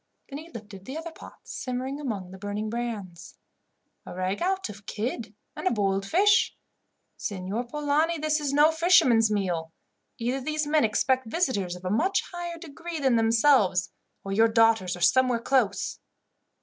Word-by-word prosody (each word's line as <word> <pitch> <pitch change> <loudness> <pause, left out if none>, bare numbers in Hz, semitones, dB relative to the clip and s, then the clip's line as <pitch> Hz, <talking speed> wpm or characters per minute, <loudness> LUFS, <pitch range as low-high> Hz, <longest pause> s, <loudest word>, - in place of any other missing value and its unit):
Then 280 +1 -6
he 325 +2 -11
lifted 210 - -10
the 270 +4 -6
other 325 +1 -6
pots - - -13
simmering 260 +2 -4
among 205 -10 -4
the 190 - -11
burning 205 +2 -4
brands. 215 -8 -5 0.7
"A - - -9
ragout 205 - -1
of 205 -1 -12
kid 220 -1 -4 0.2
and - - -3
a - - +3
boiled 195 -3 0
fish. 400 - +3 0.6
Signor 200 +4 -4
Polani, 300 +5 0
this 310 0 0
is 290 -2 -2
no 295 +3 +5
fisherman's 320 -10 +4
meal. 180 -6 -1 0.5
Either 250 +3 -2
these 305 +2 -1
men 300 -1 +2
expect 255 +3 +1
visitors 220 - -1
of 180 +1 -12
a 185 - -1
much 370 - +1
higher 345 -1 -5
degree 335 +1 -7
than 265 -4 +2
themselves, 225 -5 +3 0.3
or 195 - -5
your 225 +3 +4
daughters 225 -5 +3
are - - -11
somewhere 255 +7 +4
close. 230 -6 0
235 Hz, 160 wpm, -26 LUFS, 200-295 Hz, 0.7 s, no